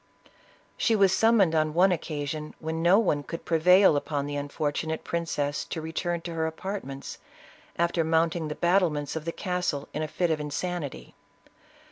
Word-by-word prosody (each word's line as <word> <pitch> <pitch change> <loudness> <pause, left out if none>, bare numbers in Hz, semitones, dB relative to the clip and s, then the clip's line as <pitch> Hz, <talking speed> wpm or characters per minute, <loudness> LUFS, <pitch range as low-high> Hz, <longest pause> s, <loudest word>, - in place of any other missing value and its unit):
She 225 - +2
was 195 -2 +4
sum 225 +3 +4
moned, 185 -6 +4
on 155 -1 +1
one 185 +2 +5
occasion, 150 -2 -4
when 160 0 -4
no 175 +4 +5
one 180 -10 +2
could 165 +3 -7
prevail 180 +2 +5
upon 145 0 -2
the 145 0 -4
unfortunate 150 +2 -2
princess 150 -4 -2
to - - -5
return 165 +2 -3
to 170 0 -6
her 160 -1 -1
apart 190 +5 -5
ments, 135 +1 -8 0.6
after 170 0 +1
mounting 160 0 +1
the 150 - -4
battlements 170 -6 +1
of 160 -1 -4
the 165 - -1
castle, 180 -6 -2
in 150 - -3
a 155 - -1
fit 175 +2 0
of 155 - 0
insanity. 150 +1 -4
160 Hz, 170 wpm, -27 LUFS, 150-175 Hz, 0.6 s, one